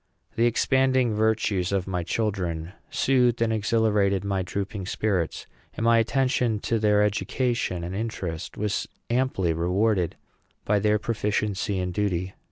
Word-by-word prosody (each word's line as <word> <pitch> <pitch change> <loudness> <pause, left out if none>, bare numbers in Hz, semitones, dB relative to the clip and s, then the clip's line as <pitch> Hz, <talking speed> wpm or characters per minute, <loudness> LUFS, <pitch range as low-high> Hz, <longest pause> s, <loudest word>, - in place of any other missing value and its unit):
The 115 +1 +3
expanding 130 0 +2
virtues 105 -4 +1
of 95 -2 0
my 90 -2 -2
children 90 -4 -2 0.2
soothed 125 -3 +2
and 115 -1 +1
exhilarated 105 -3 +2
my 100 -1 -1
drooping 100 +2 -4
spirits, 95 -6 -1 0.3
and - - -3
my 115 0 +5
attention 125 -1 +1
to 115 - 0
their 105 -1 +3
education 110 -2 -1
and 85 +2 -5
interest 95 -6 -4
was 105 -1 -1 0.2
amply 120 -9 +1
rewarded 90 +2 +1 0.5
by 105 0 +2
their 105 +1 +3
proficiency 105 -2 -1
and 90 -1 -2
duty. 95 -2 -1
105 Hz, 135 wpm, -25 LUFS, 95-115 Hz, 0.5 s, my